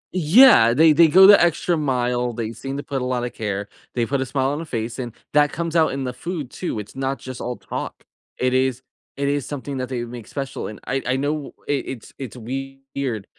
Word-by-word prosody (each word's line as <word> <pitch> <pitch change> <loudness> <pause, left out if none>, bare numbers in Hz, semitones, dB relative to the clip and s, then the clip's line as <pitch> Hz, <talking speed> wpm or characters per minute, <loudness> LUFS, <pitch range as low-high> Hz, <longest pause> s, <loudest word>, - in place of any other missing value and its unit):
Yeah, 170 - +7
they 155 +2 +6
they 165 +1 +6
go 190 +5 +7
the 200 +1 +9
extra 170 +1 +1
mile, 125 -4 0
they 115 -1 -4
seem 135 +3 -6
to 145 - -5
put 135 -2 -3
a - - -2
lotta 125 -2 -2
care, 100 -2 -4 0.3
they 120 - +1
put 135 +3 -1
a 130 - -2
smile 135 0 0
on 150 - -3
a 165 - -6
face, 115 -2 -4
and 120 -2 -4 0.2
that 145 0 +4
comes 170 -1 -4
out 160 -2 +4
in 135 0 -3
the 125 - -3
food 160 -1 -5
too, 175 - -4
it's 105 +3 -7
not 135 0 -2
just 130 +1 -8
all 125 +1 -3
talk. - - -6 0.3
It 125 0 +1
is 130 0 +1 0.3
it 140 - -1
is 140 -2 0
something 140 -1 -5
that 130 -1 -3
they 125 -2 -3
make 120 -2 -9
special, 135 -2 -5
and 105 - -9
I 135 +1 -1
I 130 - +2
know 145 +1 -2
it 145 -2 -1
it's 125 -5 -8
it's 130 -2 -7
weird 135 -2 -5
135 Hz, 230 wpm, -22 LUFS, 125-145 Hz, 0.3 s, the